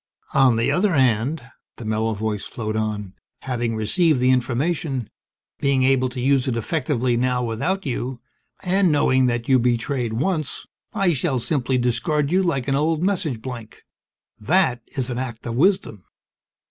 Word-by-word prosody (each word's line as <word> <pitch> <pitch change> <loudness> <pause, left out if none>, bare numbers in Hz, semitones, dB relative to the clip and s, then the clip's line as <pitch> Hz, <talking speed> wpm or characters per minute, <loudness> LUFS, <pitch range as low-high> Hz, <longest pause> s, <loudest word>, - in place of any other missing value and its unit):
"On 130 -3 +5
the 115 +1 +1
other 190 +1 +2
hand," 130 +2 +1 0.3
the 120 - -8
mellow 110 +1 0
voice 105 -1 -2
flowed 110 -2 -4
on, 105 -3 -3 0.3
"having 120 -3 -2
received 155 - +2
the 125 +1 +4
information, 130 0 -1 0.5
being 140 -2 +2
able 130 -1 +3
to 125 0 -7
use 135 +1 +2
it 120 -3 0
effectively 130 -1 0
now 125 +1 +1
without 165 - -2
you, 125 -1 -3 0.4
and 185 -1 +2
knowing 130 -3 +3
that 120 -1 -1
you 130 -1 +5
betrayed 120 0 0
once 155 +4 -2 0.3
I 195 -5 +1
shall 140 -1 0
simply 130 0 0
discard 125 +5 0
you 185 +2 +3
like 155 -9 -1
an 135 - +1
old 155 +3 +1
message 170 - -1
blank. 120 -4 -8 0.6
That 125 - +2 0.2
is 130 -1 -1
an 120 - -3
act 120 -3 -6
of 120 - -3
wisdom. 155 - +1
130 Hz, 160 wpm, -22 LUFS, 115-150 Hz, 0.6 s, On